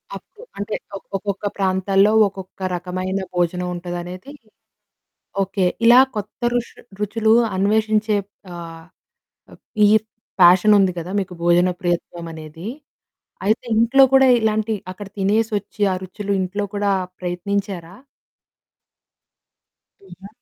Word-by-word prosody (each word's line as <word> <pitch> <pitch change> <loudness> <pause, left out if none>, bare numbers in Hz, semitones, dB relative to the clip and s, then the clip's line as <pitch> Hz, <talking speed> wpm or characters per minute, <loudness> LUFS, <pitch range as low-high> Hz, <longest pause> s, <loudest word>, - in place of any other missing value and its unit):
అప్పు 430 - -13 0.2
అంటే, 205 +1 -3 0.4
ఒక్కొక్క 200 +1 -4
ప్రాంతాల్లో, 195 +1 +2 0.2
ఒక్కొక్క 190 -1 -11 0.2
రకమైన 185 +2 -3 0.2
భోజనం 180 +1 0
ఉంటదనేది 175 +7 -7 1.1
ఓకే, 190 0 -1 0.2
ఇలా 240 +2 +8 0.2
కొత్త 210 +4 -6
రుష్ 240 -1 -2 0.3
రుచులు 220 +1 +1 0.2
అన్వేషించే 215 +1 +1 0.4
ఆహ్, 165 -1 -9 0.7
అప్ - - -17 0.2
ఈర్ 215 +1 +4 0.4
ఫ్యాషనుంది 190 +2 +6
కదా, 170 +2 -6
మీకు 185 -1 -6
భోజన 175 +1 +4
ప్రియత్వమనేది, 170 0 -4 0.8
అయితే 220 +4 +1 0.2
ఇంట్లో 265 +4 +6
కూడా 265 0 +6
ఇలాంటి 220 0 0 0.2
అక్కడ 205 +1 -9
తినేసొచ్చి, 210 +1 -1
ఆ - - 0
రుచులు 200 +2 -5
ఇంట్లో 200 +3 -2
కూడా 205 0 +1 0.3
ప్రయత్నించారా? 185 0 -4 2.1
హుహు. 190 0 -13
195 Hz, 100 wpm, -21 LUFS, 180-210 Hz, 2.1 s, ఇలా